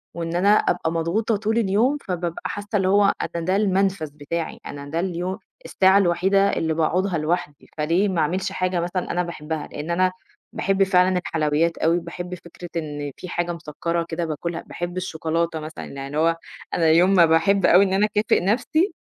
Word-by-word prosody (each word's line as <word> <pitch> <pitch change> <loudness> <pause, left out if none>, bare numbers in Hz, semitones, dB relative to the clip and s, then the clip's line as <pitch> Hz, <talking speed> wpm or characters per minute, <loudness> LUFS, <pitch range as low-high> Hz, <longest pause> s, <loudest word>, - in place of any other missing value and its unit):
وإن 170 0 -3
أنا 190 +3 +3
أبقى 175 -5 +2
مضغوطة 170 +7 0
طول 220 +2 -1
اليوم، 230 +6 +2
فبابقى 175 -2 -3
حاسّة 205 0 -4
اللي 190 -2 +2
هو 200 +1 +4 0.2
أنا 170 -1 -2
ده 185 +1 +1
المنفَذ 195 -5 +1
بتاعي 155 +3 -4
أنا 140 0 -7
ده 165 +3 -2
اليو 185 +2 -3 0.3
الساعة 190 +1 +4
الوحيدة 195 +2 +3
اللي 160 0 0
باقعدها 170 +3 +1
لوحدي، 155 -2 -2
فليه 170 +7 +2
ما 170 -4 0
أعملش 185 +5 -1
حاجة 185 -1 -1
مثلًا 175 +1 -2
أنا 180 - 0
باحبها 160 -3 -5
لإن 150 +3 -6
أنا 185 +1 +2 0.4
باحب 195 0 +1
فعلًا 185 -1 +3
الحلويّات 160 -1 0
أوي، 170 +2 +2
باحب 175 +2 -6
فكرة 175 0 -11
إن 145 -2 -4
في 180 - -8
حاجة 175 0 -1
مسكّرة 170 +1 -3
كده 170 +1 -2
باكلها، 165 +2 -4
باحب 175 +1 -6
الشوكولاتة 165 -2 -2
مثلًا، 155 +1 -7
يعني 135 0 -7
اللي 145 +2 -5
هو، 165 +1 +2 0.4
أنا 165 -2 +2
يوم 175 +4 +5
ما 170 - +7
باحب 165 +4 +3
أوي 185 +3 +7
إن 190 - -1
أنا 205 +2 +3
أكافئ 210 -3 +1
نَفْسي، 310 - +1
175 Hz, 180 wpm, -23 LUFS, 165-190 Hz, 0.4 s, ما